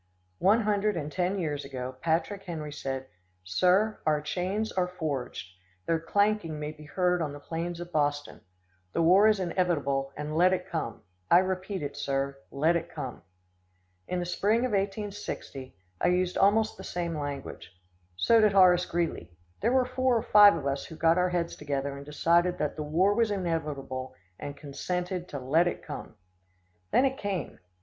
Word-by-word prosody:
One 205 +5 +4
hundred 210 -2 +1
and 150 -2 -4
ten 185 +4 0
years 150 -5 -2
ago, 130 -1 -6
Patrick 170 +5 0
Henry 155 -4 -5
said: 135 -2 -4 0.4
"Sir, 185 - +2
our 150 -1 +2
chains 185 +8 -2
are 180 -1 0
forged. 140 - -4 0.3
Their 165 -1 +1
clanking 200 -2 0
may 150 0 -4
be 155 0 -13
heard 180 +2 +1
on 150 -3 -2
the 145 - -8
plains 170 +3 -4
of 175 0 -7
Boston. 145 -2 -1 0.5
The 165 - +1
war 190 +6 +6
is 215 -2 +3
inevitable, 155 -7 0
and 150 +1 -4
let 180 +3 +5
it 185 - -2
come. - - -4 0.3
I 170 - +8
repeat 185 0 -1
it, 140 0 -4
sir, 140 -1 -2
let 155 +5 +2
it 170 0 -2
come!" 135 -6 -6 0.9
In 180 - -2
the 175 - -2
spring 205 +6 +1
of 255 -1 0
1860, 195 - -4 0.3
I - - +3
used 180 0 +1
almost 215 +3 +3
the - - -9
same 170 -2 -3
language. 145 -2 -6 0.4
So 225 - +4
did 210 -2 +4
Horace 180 -2 +6
Greeley. 165 - -2 0.3
There 230 +4 +1
were 260 -1 +3
four 255 -1 +1
or 225 - -1
five 205 -3 +8
of 150 -4 -5
us 140 0 -1
who 160 - -10
got 165 +2 +3
our 180 0 +2
heads 175 -1 -1
together 140 -1 -3
and 140 - -8
decided 170 +4 +2
that 150 - -2
the 155 - -5
war 170 +7 +2
was 230 +1 +2
inevitable, 150 -9 -3 0.2
and 145 0 -6
consented 180 +5 -4
to 145 - -6
let 155 +7 +3
it - - -3
come. 145 -6 -7 0.7
Then 265 - +4
it 265 0 -1
came. 200 -2 -3
170 Hz, 175 wpm, -28 LUFS, 145-195 Hz, 0.9 s, I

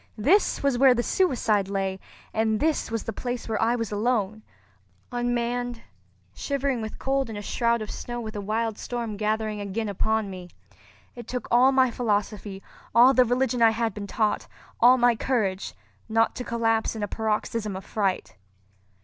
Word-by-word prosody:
This 315 - +2
was 275 -4 +1
where 265 -2 +6
the 240 - 0
suicide 230 - +1
lay; 195 -1 -2 0.3
and 220 -1 +1
this 315 0 0
was 225 -1 -2
the 225 - -4
place 245 +2 -4
where 220 -2 -1
I 230 +2 +3
was 230 -3 -3
alone—unmanned, 225 - -3 0.5
shivering 275 -3 -1
with 220 0 -6
cold 270 -2 -1
in 220 - -6
a 205 - -6
shroud 235 +1 0
of 210 - -7
snow 240 0 -5
with 220 -1 -6
a 205 - -3
wild 220 +1 -2
storm 235 -3 -4
gathering 215 0 -1
again 205 +2 -3
upon 215 +1 -1
me! 180 -1 -9 0.7
It 240 -2 -9
took 250 -2 -4
all 250 +3 +6
my 260 -2 +3
philosophy, 210 -4 -2 0.3
all 245 +3 +7
the 255 -1 +5
religion 245 0 0
I 225 - +7
had 225 -1 -1
been 205 0 -6
taught, 215 0 0 0.3
all 250 +2 +7
my 240 -1 +4
courage, 210 -6 -1 0.3
not 225 +1 +2
to 250 - -3
collapse 225 -2 0
in 215 - -4
a - - -1
paroxysm 215 -1 -2
of 190 +1 -7
fright. 195 - -2
225 Hz, 170 wpm, -26 LUFS, 210-245 Hz, 0.7 s, all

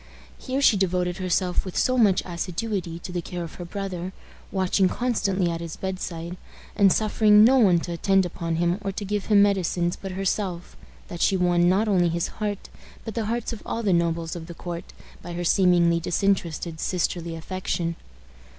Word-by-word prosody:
Here 270 +2 -2
she 215 - +6
devoted 180 -2 0
herself 185 -1 0
with 185 - -6
so 255 - +2
much 210 -7 +4
assiduity 180 0 -3
to 170 - -8
the 175 -1 -2
care 175 +1 -5
of 165 - -8
her - - -5
brother, 185 -1 -5 0.4
watching 190 0 +2
constantly 195 -7 0
at 165 0 -4
his 165 -1 -6
bedside, 180 -2 -5 0.4
and 200 -2 +5
suffering 215 0 +5
no 260 +4 +6
one 185 -7 +5
to 175 - -5
attend 190 +2 +2
upon 170 -1 -3
him 175 +3 +1
or 195 -1 -2
to 200 +2 -5
give 205 0 -2
him 205 -2 +6
medicines 180 -3 +1
but 195 -1 -7
herself, 190 -2 -2 0.3
that 175 0 -7
she 195 - +3
won 175 -1 +3
not 200 +4 +2
only 180 -4 +3
his 170 +1 -1
heart, 205 -2 -3 0.4
but 225 - -5
the 225 0 -2
hearts 235 +2 -2
of 225 - -8
all 230 - -3
the 195 -4 +2
nobles 170 -1 0
of 165 -1 -7
the 170 - -9
court, 170 0 -7 0.3
by 175 - -7
her 175 +1 -3
seemingly 175 -2 +4
disinterested 170 -2 -1
sisterly 170 -1 -2
affection. 170 0 -3
180 Hz, 185 wpm, -25 LUFS, 170-200 Hz, 0.4 s, she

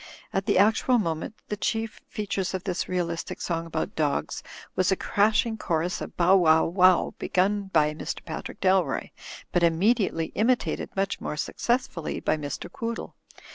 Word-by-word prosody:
At 195 +1 -1
the 205 - +3
actual 220 +5 +4
moment 165 0 -2
the 210 - -1
chief 225 +2 -2
features 195 -3 -2
of 185 - -4
this 185 -3 -2
realistic 170 -2 -2
song 165 -1 -2
about 160 -1 -3
dogs 150 -3 -1 0.3
was 185 0 +2
a - - +4
crash 210 +4 +2
ing 220 -2 -4
chorus 170 +2 -1
of - - -7
''Bow 185 +2 +5
wow, 160 -2 +5
wow," 185 +1 +4
begun 200 +1 +1
by 150 -3 +3
Mr. 155 - -6
Pat 160 - -5
rick - - -11
Dalroy; 190 -1 +2 0.4
but 175 - +2
immediately 170 0 +2
imitated 245 +3 +1
(much 195 0 -1
more - - -3
successfidly) 235 0 -1
by - - +3
Mr. 145 -2 -5
Quoodle. 230 0 -5
185 Hz, 165 wpm, -26 LUFS, 165-210 Hz, 0.4 s, Bow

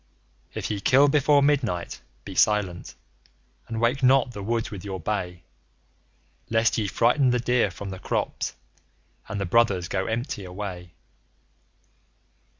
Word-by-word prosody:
If - - -3
ye 105 - -2
kill 135 +8 +5
before 145 0 +4
midnight, 125 -12 0 0.2
be - - -7
silent, 105 -5 +1 0.7
and 115 - -4
wake 120 +4 +1
not 130 -1 +4
the 105 - -7
woods 115 +2 -2
with 100 -3 -7
your 95 -2 -5
bay, 90 -2 -3 1.1
Lest 115 0 +2
ye 105 - -1
frighten 125 +6 +3
the 125 0 +2
deer 120 -3 +2
from 95 +2 -7
the 95 - -7
crops, - - -2 0.7
and 100 - -3
the 100 - -1
brothers 95 -3 +2
go 95 +1 -2
empty 115 -2 -3
away. 90 -2 -7
105 Hz, 140 wpm, -25 LUFS, 95-125 Hz, 1.1 s, kill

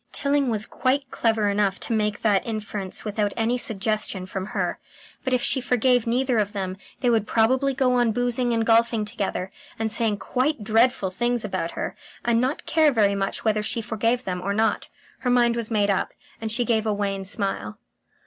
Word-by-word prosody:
Tilling 280 -2 +1
was 215 -2 0
quite 270 +2 -1
clever 225 -2 +1
enough 200 -1 +1
to - - -1
make 210 -1 0
that 205 -3 +3
inference 210 -4 -5
without 205 -1 -1
any 230 +2 +1
suggestion 215 -4 -1
from 190 0 -5
her.... - - -2 0.4
But 260 - -2
if 255 -1 +2
she 260 - +2
forgave 250 -1 +2
neither 250 0 +2
of 205 0 -1
them, 190 -2 -3 0.2
they 250 - +3
would 220 -2 +1
probably 260 +4 +2
go 255 -1 +2
on 240 -2 +3
boozing 245 +1 0
and 225 -1 +1
golfing 230 -1 +3
together, 200 -3 -3 0.3
and 220 -1 -1
saying 220 -2 0
quite 255 +3 -1
dreadful 225 -2 +2
things 240 +3 -1
about 185 -4 -3
her, - - -4 0.3
and 235 -1 +3
not 260 +4 -1
care 315 -2 +4
very 210 -5 +3
much 195 +2 -2
whether 215 -1 +2
she 215 - -1
forgave 230 +2 0
them 180 -1 -3
or 200 +2 -1
not. 220 +1 +1 0.3
Her 250 - -1
mind 240 -1 +4
was 235 -2 -3
made 205 -3 +2
up, 195 - -1 0.3
and 220 -1 -3
she 240 +2 0
gave 220 -1 +1
a 215 - +2
wan 200 -1 -2
smile. 195 - -3
225 Hz, 195 wpm, -24 LUFS, 205-245 Hz, 0.4 s, care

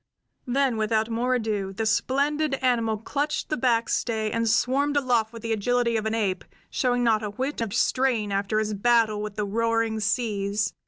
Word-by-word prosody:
Then 260 -1 +1
without 220 +1 0
more 245 +3 +1
ado 210 -5 -2
the 220 +3 -3
splendid 280 +6 +1
human 270 - -3
animal 230 -3 +1
clutched 290 +7 -2
a - - +3
backstay 230 -3 0
and 230 0 0
swarmed 275 +6 +2
aloft 240 -5 +1
with 230 -1 -10
the 230 -1 -1
agility 235 +2 +1
of 220 0 -1
an 220 - -1
ape, 195 -5 -1 0.3
showing 245 -1 +1
not 220 -2 +3
a 210 - -3
whit 260 +6 -3
of 225 -3 -2
strain 240 -3 +1
after 200 +2 -1
his 215 0 0
battle 220 0 +2
with 210 -1 -5
the 210 0 -1
roaring 225 +1 0
seas. 210 -2 -1
230 Hz, 180 wpm, -25 LUFS, 215-250 Hz, 0.3 s, a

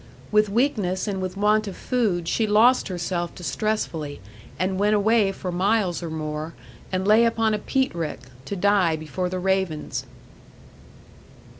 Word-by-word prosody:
With 210 -1 +4
weakness 205 -5 0
and 195 -2 -2
with 185 0 -4
want 210 +1 +2
of 195 - -6
food, 205 -10 0
she 220 +4 +1
lost 225 +5 +4
herself 175 -2 -3
distressfully, 175 -6 -3 0.4
and 185 +2 -1
went 210 +1 +3
away 210 -1 +3
for 185 -1 -5
miles 190 0 +1
or 170 - -4
more, 155 0 -4 0.4
and 185 +1 -1
lay 215 +2 +6
upon 225 -1 +2
a 210 - 0
peat 265 -1 0
rick, 165 -3 -4 0.2
to 200 - -4
die 195 -3 +3
before 155 +4 -3
the 185 - -3
ravens. 190 -4 -1
190 Hz, 150 wpm, -24 LUFS, 175-215 Hz, 0.4 s, lay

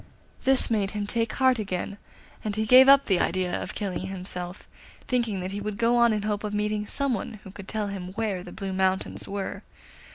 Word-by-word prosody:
This 265 -2 +4
made 205 -3 +1
him 205 - -1
take 230 +2 0
heart 260 -3 +3
again, 200 0 -3 0.4
and 210 -2 -2
he 220 0 0
gave 255 +4 +8
up 275 0 +7
the 190 -3 +2
idea 185 -1 0
of - - -6
killing 190 -2 -3
himself, 180 -1 -6 0.4
thinking 230 -6 0
that 185 +1 -4
he 205 +1 -4
would 210 0 -4
go 235 +2 +3
on 235 -1 +5
in 210 -1 -1
hope 210 0 -1
of 210 0 -3
meeting 210 0 -1
some 280 +2 0
one 215 - -3
who 190 - -10
could 195 0 -10
tell 215 -1 -2
him 195 -3 -5
where 210 -4 -2
the - - -10
Blue 195 -2 -5
Mountains 190 0 0
were. 200 -1 -4
205 Hz, 215 wpm, -26 LUFS, 190-225 Hz, 0.4 s, gave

